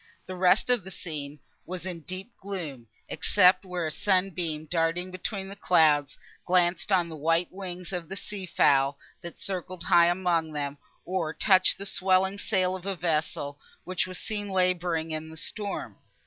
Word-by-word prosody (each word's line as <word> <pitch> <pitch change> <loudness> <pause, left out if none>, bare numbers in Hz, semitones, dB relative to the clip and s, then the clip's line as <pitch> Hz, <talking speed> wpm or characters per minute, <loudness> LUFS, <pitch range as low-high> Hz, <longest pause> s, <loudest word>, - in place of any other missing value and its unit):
The 185 - -6
rest 185 +6 +4
of 245 -5 +2
the 190 - -8
scene 150 -6 -6 0.3
was 180 0 -6
in 180 -3 -5
deep 185 +7 -7
gloom, 160 -12 -6 0.2
except 185 -1 +4
where 180 -2 -3
a 155 - -2
sunbeam, 180 -4 0
darting 170 +3 0
between 190 +2 -4
the 195 - -7
clouds, 155 -7 +3 0.3
glanced 180 +2 +2
on 180 -3 +3
the 160 - -7
white 165 +3 +1
wings 185 -1 -6
of 175 -2 -4
the 195 - -4
sea 200 -1 -6
fowl, 140 -4 +3 0.2
that 170 - -8
circled 185 -1 -5
high 170 0 +6
among 175 -3 +1
them, 145 -1 -3 0.3
or 170 -3 -2
touched 185 -3 +4
the 200 - -6
swelling 190 0 +2
sail 185 -3 +1
of 185 +1 -8
a 195 - -1
vessel, 155 -4 -1 0.2
which 185 0 -1
was 185 -1 -7
seen 205 -2 -4
labouring 180 -3 +1
in 155 0 -4
the 160 - -11
storm. 205 +5 -4
180 Hz, 170 wpm, -27 LUFS, 160-190 Hz, 0.3 s, high